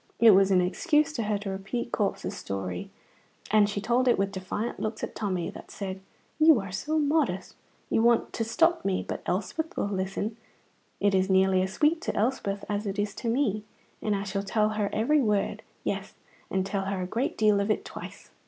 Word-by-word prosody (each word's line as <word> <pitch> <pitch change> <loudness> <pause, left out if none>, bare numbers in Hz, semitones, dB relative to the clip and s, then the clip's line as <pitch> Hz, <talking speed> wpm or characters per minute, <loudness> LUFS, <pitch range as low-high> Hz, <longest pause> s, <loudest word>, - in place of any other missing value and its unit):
It 230 -1 +8
was 195 0 +5
an 185 -2 +4
excuse 300 - +2
to 240 - -2
her 210 -1 0
to 200 -1 -5
repeat 195 +5 -4
Corp's 205 -1 -1
story, 95 - -4 0.6
and 210 -1 +5
she 205 - -2
told 240 +5 +1
it 245 - +5
with 195 0 0
defiant 195 +4 -4
looks 215 0 -3
at - - -3
Tommy 185 -5 -2
that - - -11
said, 190 -2 -5 0.4
"You 310 -5 +7
are 195 -2 -6
so 300 +12 -1
modest, 290 - +1 0.4
you - - +3
want 235 0 +3
to 225 - -1
stop 330 +9 +2
me, 195 -1 0
but - - -4
Elspeth 220 - -2
will - - +1
listen; 200 +2 -2 0.6
it 200 0 +2
is 190 0 +2
nearly 190 0 +4
as 190 +1 -2
sweet 310 - +2
to - - -3
Elspeth 205 -3 -1
as 205 0 -2
it 195 +1 -3
is 205 0 -1
to 235 - -3
me, 225 -4 +1 0.4
and 210 -1 0
I 195 - -2
shall 200 0 -2
tell 210 +2 +1
her 210 -2 -1
every 290 +7 +3
word, 210 -4 0 0.2
yes, - - -3 0.3
and 190 0 0
tell 195 0 -2
her 190 -1 -2
a - - -2
great 230 +8 -2
deal 210 -2 +4
of 200 +1 0
it 215 - 0
twice." - - -9
205 Hz, 205 wpm, -28 LUFS, 195-230 Hz, 0.6 s, It